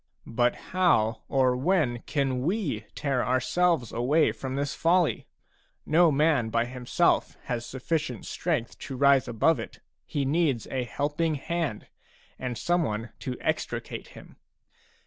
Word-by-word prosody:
But 120 Hz, +1 st, +1 dB
how 115 Hz, -12 st, +1 dB
or 130 Hz, -2 st, +3 dB
when 135 Hz, -4 st, +1 dB
can 135 Hz, -4 st, 0 dB
we 155 Hz, -, -1 dB
tear 135 Hz, -4 st, 0 dB
ourselves 130 Hz, +2 st, +1 dB
away 145 Hz, +7 st, +2 dB
from 130 Hz, -1 st, -5 dB
this 140 Hz, 0 st, -1 dB
folly? 170 Hz, 0 st, +2 dB, 0.6 s
No 165 Hz, +1 st, +5 dB
man 145 Hz, -5 st, +2 dB
by 115 Hz, +1 st, +1 dB
himself 125 Hz, 0 st, 0 dB
has 120 Hz, -1 st, -3 dB
sufficient 130 Hz, -, -3 dB
strength -, -, -2 dB
to 130 Hz, -, -6 dB
rise 140 Hz, -1 st, +4 dB
above 120 Hz, +8 st, +2 dB
it; -, -, -8 dB, 0.3 s
he 145 Hz, -2 st, -1 dB
needs 140 Hz, -5 st, +1 dB
a 130 Hz, -2 st, -1 dB
helping 150 Hz, +5 st, -1 dB
hand, 155 Hz, -5 st, -3 dB, 0.5 s
and 125 Hz, -2 st, -3 dB
some 175 Hz, 0 st, +1 dB
one 115 Hz, -5 st, -3 dB
to 125 Hz, -1 st, -4 dB
extricate -, -, -3 dB
him. -, -, -14 dB
135 Hz, 135 wpm, -27 LUFS, 125-160 Hz, 0.6 s, No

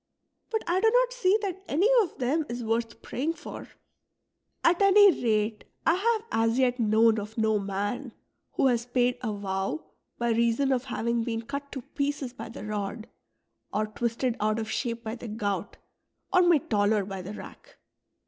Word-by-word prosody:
But 445 Hz, -2 st, -1 dB
I 350 Hz, +2 st, +1 dB
do 445 Hz, -, +5 dB
not -, -, +3 dB
see 415 Hz, -5 st, +3 dB
that 385 Hz, -1 st, -4 dB
any 345 Hz, +9 st, +3 dB
of 375 Hz, -, -4 dB
them 275 Hz, +6 st, +1 dB
is 240 Hz, 0 st, -4 dB
worth 230 Hz, 0 st, -2 dB
praying 295 Hz, +6 st, -2 dB
for. -, -, -9 dB, 1.0 s
At 345 Hz, +3 st, +4 dB
any 400 Hz, 0 st, +8 dB
rate 215 Hz, -1 st, +1 dB, 0.2 s
1 330 Hz, -, +4 dB
have 440 Hz, +3 st, +1 dB
as 225 Hz, +1 st, +2 dB
yet 255 Hz, -1 st, +2 dB
known 220 Hz, 0 st, +4 dB
of 210 Hz, +2 st, -8 dB
no 220 Hz, -1 st, +2 dB
man 205 Hz, +6 st, -3 dB, 0.4 s
who -, -, +1 dB
has 240 Hz, -2 st, +2 dB
paid 245 Hz, 0 st, +1 dB
a 230 Hz, -3 st, -2 dB
vow 195 Hz, +6 st, -3 dB, 0.3 s
by 235 Hz, 0 st, 0 dB
reason 235 Hz, +4 st, +2 dB
of 260 Hz, 0 st, 0 dB
having 235 Hz, -2 st, -1 dB
been 225 Hz, -1 st, -3 dB
cut 280 Hz, +3 st, -6 dB
to 265 Hz, -, -5 dB
pieces 280 Hz, -2 st, -3 dB
by 250 Hz, -, -8 dB
the 225 Hz, -, -8 dB
rod, 210 Hz, +1 st, -4 dB, 0.6 s
or 215 Hz, +1 st, 0 dB
twisted 235 Hz, +3 st, -1 dB
out 215 Hz, +1 st, +1 dB
of 220 Hz, -1 st, -3 dB
shape 235 Hz, -1 st, -2 dB
bv 225 Hz, +2 st, -5 dB
the 240 Hz, -, -7 dB
gout, 210 Hz, -2 st, -3 dB, 0.6 s
or 365 Hz, -, +6 dB
made 345 Hz, -6 st, +3 dB
taller 205 Hz, -1 st, +2 dB
by 195 Hz, -1 st, -6 dB
the 190 Hz, +3 st, -7 dB
rack." -, -, -12 dB
235 Hz, 175 wpm, -27 LUFS, 215-285 Hz, 1.0 s, any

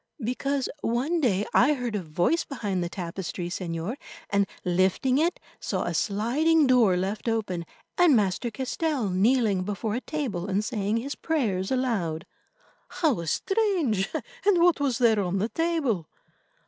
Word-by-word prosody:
"Because 270 Hz, +3 st, -1 dB
one 265 Hz, +10 st, 0 dB
day 205 Hz, -6 st, +2 dB
I 285 Hz, +4 st, +5 dB
heard 245 Hz, -4 st, -3 dB
a 205 Hz, -, -1 dB
voice 175 Hz, -, +1 dB
behind 205 Hz, -9 st, -3 dB
the 170 Hz, -, -3 dB
tapestry, 175 Hz, -1 st, -5 dB
Señor, 175 Hz, +5 st, -4 dB, 0.3 s
and, 200 Hz, -1 st, +2 dB, 0.2 s
lifting 190 Hz, +9 st, +2 dB
it, 335 Hz, +3 st, +1 dB, 0.2 s
saw -, -, -2 dB
a -, -, -2 dB
sliding 285 Hz, +10 st, +2 dB
door 240 Hz, -8 st, +4 dB
left 200 Hz, +5 st, -2 dB
open, 185 Hz, -7 st, -2 dB, 0.3 s
and 345 Hz, -6 st, +6 dB
Master 210 Hz, +2 st, +1 dB
Castell 260 Hz, -, -2 dB
kneeling 210 Hz, 0 st, +2 dB
before 205 Hz, +3 st, -3 dB
a 245 Hz, -, -2 dB
table 240 Hz, -, -3 dB
and 200 Hz, +2 st, 0 dB
saying 215 Hz, -2 st, -1 dB
his 275 Hz, +5 st, -3 dB
prayers 215 Hz, -, -1 dB
aloud." 210 Hz, -12 st, -1 dB, 0.6 s
"How 305 Hz, -, 0 dB
strange! 335 Hz, -, +1 dB, 0.3 s
And 400 Hz, -2 st, +4 dB
what 350 Hz, -3 st, +4 dB
was 270 Hz, -4 st, +1 dB
there 230 Hz, -4 st, +4 dB
on 185 Hz, 0 st, -1 dB
the 210 Hz, +4 st, 0 dB
table?" 300 Hz, -, -1 dB
225 Hz, 150 wpm, -26 LUFS, 190-275 Hz, 0.6 s, and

